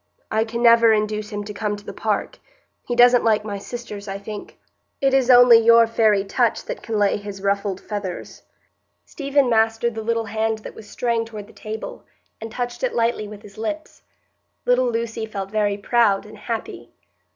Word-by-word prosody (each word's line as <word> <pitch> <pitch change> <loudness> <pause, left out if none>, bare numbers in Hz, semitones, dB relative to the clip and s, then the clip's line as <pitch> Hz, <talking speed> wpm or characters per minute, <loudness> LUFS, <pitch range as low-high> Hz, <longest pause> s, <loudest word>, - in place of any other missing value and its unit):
I 220 +1 +1
can 235 +1 -4
never 230 -1 +6
induce 210 0 -1
him 205 0 -4
to 210 0 -7
come 210 0 -2
to 205 - -13
the - - -7
park; - - -2 0.5
he 240 - -1
doesn't 245 0 +6
like 215 -2 +2
my 200 -2 -4
sisters, 210 -2 -8
I 195 0 -4
think. 205 +1 -9 0.4
It 270 -1 +2
is 265 -2 +3
only 245 -2 +8
your 230 0 +6
faëry 215 -3 +2
touch 235 +3 0
that - - -6
can 225 -2 -3
lay 205 -1 +2
his 200 -1 -8
ruffled 200 -1 -1
feathers." 200 -4 -6 0.6
Stephen 280 -2 0
mastered 225 0 +2
the 220 - -5
little 230 0 -1
hand 220 +1 -1
that - - -7
was 210 - -13
straying 235 -2 -1
toward 215 -3 -9
the - - -18
table, 220 +1 -7 0.4
and 225 0 -7
touched 245 - -4
it - - -1
lightly 230 -2 0
with 210 0 -11
his 205 0 -14
lips. 310 +8 -5 0.6
Little 250 0 +3
Lucy 230 -1 -3
felt 195 -2 -6
very 205 -2 0
proud 205 -1 +2
and 210 0 -13
happy. 225 +1 -5
220 Hz, 185 wpm, -22 LUFS, 205-235 Hz, 0.6 s, only